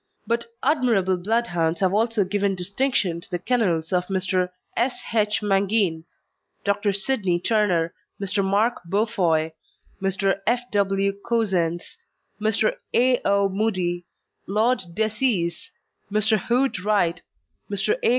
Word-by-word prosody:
But 235 0 -1 0.2
admirable 230 - +2
Bloodhounds 175 -4 0
have 190 -1 +2
also 225 0 +2
given 200 +1 0
distinction 190 -2 0
to - - -10
the 175 - -1
kennels 180 -6 0
of 180 0 +1
Mr. 185 -1 0 0.3
S. 245 +2 0
H. 210 -1 +1
Mangin, 195 -4 +2 0.6
Dr. 200 0 +1
Sidney 195 -3 0
Turner, 180 -4 +1 0.3
Mr. 200 0 0
Mark 205 +5 +1
Beaufoy, 175 -5 +1 0.5
Mr. 195 0 +1
F. 240 +2 +2
W. 195 -1 +1
Cousens, 185 -8 -1 0.4
Mr. 215 0 +1 0.2
A. 250 +1 +3
O. 200 0 +3
Mudie, 185 -4 -1 0.4
Lord 220 +6 +2 0.2
Decies, 215 -5 0 0.4
Mr. 215 +1 +3
Hood 250 -2 +1
Wright, 180 -5 +1 0.5
Mr. 200 +1 +2
A. - - +3
200 Hz, 120 wpm, -23 LUFS, 180-220 Hz, 0.6 s, A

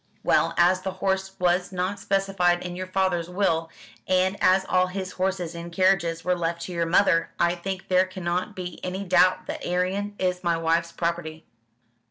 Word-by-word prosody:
"Well, - - +2
as 180 +2 +4
the 190 0 -4
horse 190 0 -1
was 180 +1 +1
not 185 +2 -2
specified 195 -3 +1
in 175 0 -5
your 185 +1 -5
father's 185 -2 0
will, 175 -4 0 0.4
and 185 +1 +2
as 190 +1 +4
all 185 -1 +2
his 185 0 -5
horses 185 -2 -2
and 170 0 -7
carriages 170 -2 +1
were 180 0 +2
left 170 -1 -2
to - - -6
your 170 -1 -1
mother, 165 -1 +3
I 170 0 +3
think 190 +2 -5
there 185 0 +3
cannot 185 +2 -3
be 180 -2 -7
any 185 +2 -3
doubt 185 0 +3
that - - -6
Arion 190 +3 -1
is 180 -1 -1
my 170 -1 +1
wife's 165 +1 0
property." 165 -2 -3
180 Hz, 180 wpm, -25 LUFS, 170-190 Hz, 0.4 s, as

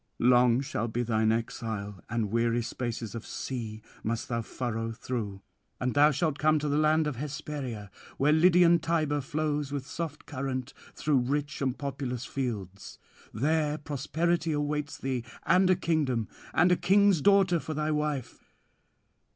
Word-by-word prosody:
Long 125 0 +4
shall 135 -5 -2
be 120 +2 -1
thine 110 -1 +2
exile, 110 -4 -3
and 110 -3 -1
weary 115 +1 +1
spaces 115 -2 -4
of 115 -1 -5
sea 110 -4 -5 0.2
must 115 +1 -2
thou 115 -1 0
furrow 115 -1 -3
through; 110 -5 -4 0.4
and 125 0 -1
thou 145 +1 +6
shalt 155 -1 0
come 155 +1 +4
to 150 0 -2
the 145 +1 +1
land 155 +1 +3
Hesperia, 140 -6 -5 0.3
where 145 +2 +3
Lydian 170 +1 +6
Tiber 155 -3 0
flows 150 0 -2
with 140 -2 -3
soft 160 -1 -5
current 130 -2 -4 0.2
through 150 -3 +2
rich 145 +4 -2
and 130 -1 0
populous 135 -3 -4
fields. 100 -8 -5 0.3
There 150 +5 +1
prosperity 160 +3 -1
awaits 145 0 -2
thee, 130 -4 -2 0.2
and 185 0 +4
a 185 - +6
kingdom, 140 - 0 0.2
and 175 +2 +4
a - - +6
king's 195 -1 +4
daughter 195 -1 +4
for 155 0 -5
thy 155 +1 0
wife. 150 -4 -3
140 Hz, 150 wpm, -29 LUFS, 120-155 Hz, 0.4 s, thou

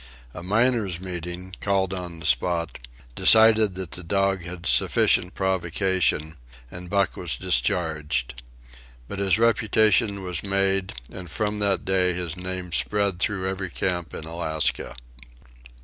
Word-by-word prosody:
A - - -8
"miners' 105 -1 +1
meeting," 90 0 -6
called 95 -2 0
on 90 -3 -6
the - - -9
spot, 85 +6 0 0.3
decided 110 - +6
that 95 -3 -6
the 90 - -6
dog 95 +1 0
had 90 0 -8
sufficient 90 +1 +2
provocation, 95 -4 0 0.3
and 90 0 -8
Buck 100 0 0
was - - -2
discharged. 75 -2 -1 0.7
But 100 - -7
his 100 -1 +2
reputation 110 -2 +2
was 90 -1 -4
made, 95 -1 0 0.2
and 90 -2 -9
from 105 +4 -2
that 100 -2 +1
day 90 -1 +2
his 85 -2 -3
name 90 -1 -5
spread 100 +1 +1
through 95 0 0
every 95 -1 -4
camp 90 -1 -2
in - - -7
Alaska. 80 -6 -2
95 Hz, 135 wpm, -24 LUFS, 85-100 Hz, 0.7 s, decided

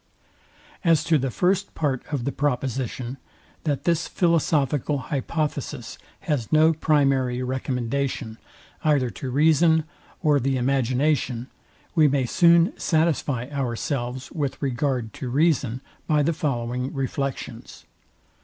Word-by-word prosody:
As 165 -3 +4
to 160 -1 +3
the 135 0 -1
first 185 - 0
part 140 -5 0
of 135 -5 -2
the 140 - 0
proposition, 130 -2 -2 0.5
that 140 -3 -1
this 170 -1 +1
philosophical 150 -5 +1
hypothesis 145 -2 -3 0.2
has 150 - -2
no 155 +1 +5
primary 135 -5 +2
recommendation, 125 -2 -2 0.4
either 140 -6 +2
to 130 - -6
reason, 160 +4 +4 0.4
or 150 -2 +4
the 135 +1 0
imagination, 130 0 0 0.4
we 155 -3 +5
may 135 -2 +1
soon 170 - +4
satisfy 155 -6 +1
ourselves 130 -1 -3
with 145 -5 -3
regard 130 -4 -1
to 130 - -5
reason 135 -3 +1 0.3
by 150 -1 +3
the 165 +3 +1
following 125 -3 -2
reflections. 135 0 -4
140 Hz, 115 wpm, -24 LUFS, 125-155 Hz, 0.5 s, no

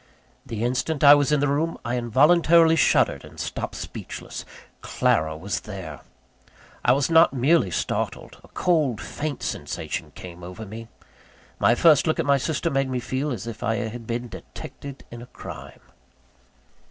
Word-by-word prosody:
The 115 -1 -4
instant 130 +5 -1
I 145 0 +10
was 145 0 +3
in 150 -2 +3
the 145 - +2
room, 155 +4 0
I 120 +1 -1
involuntarily 160 +7 +4
shuddered - - +3
and - - -13
stopped - - -4
speechless. - - -7 0.4
Clara 80 0 0
was 95 +4 -3
there! 95 -8 -8 0.8
I 120 - +4
was 140 +4 +1
not 165 -1 +6
merely 135 - +3
startled; - - -3
a - - -16
cold, 155 -10 +1
faint 150 -2 -5
sensation - - -4
came 90 -1 -10
over 90 +5 -8
me. 110 +3 -9 0.7
My 120 - +4
first 155 +2 +5
look 155 - +1
at - - +1
my 140 -1 +4
sister 160 +4 -1
made 135 -1 0
me 130 -1 -1
feel 130 +5 -2
as 120 -5 -4
if 115 -2 -7
I 115 +1 0
had 115 0 -5
been 120 +1 -3
detected 140 +3 -10
in 120 0 -8
a 120 - -11
crime. - - -10
130 Hz, 165 wpm, -24 LUFS, 115-150 Hz, 0.8 s, I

